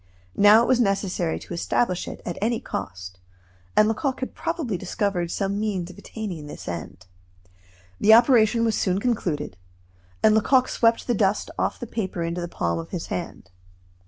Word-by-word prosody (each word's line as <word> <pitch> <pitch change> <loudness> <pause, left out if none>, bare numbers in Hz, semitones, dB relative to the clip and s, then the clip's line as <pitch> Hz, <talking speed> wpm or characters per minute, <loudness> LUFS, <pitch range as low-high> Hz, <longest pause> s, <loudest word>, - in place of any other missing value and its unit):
Now 210 +3 +7
it - - -1
was 255 -1 +3
necessary 195 -6 0
to - - -9
establish 180 +2 0
it, - - -8
at 175 - -4
any 230 +2 +1
cost, 90 -1 -6 0.6
and 215 - +6
Lecoq 260 +4 -1
had 260 - -4
probably 330 - -3
discovered 180 -1 -2
some 200 +2 -1
means 190 -5 -2
of 185 - -16
attaining 195 -9 -6
this - - -9
end. 85 +2 -6 0.9
The 220 +1 +7
operation 230 -1 +4
was 225 - +1
soon 190 -2 0
concluded; 170 - -2 0.7
and 215 - +6
Lecoq 255 +4 +3
swept 230 -1 +2
the 240 - +1
dust 205 -1 +1
off - - -1
the - - -5
paper 190 -6 -3
into 170 +1 -3
the 175 - -3
palm 85 - -2
of 80 - -7
his - - -4
hand. 95 - -6
200 Hz, 170 wpm, -24 LUFS, 170-230 Hz, 0.9 s, Now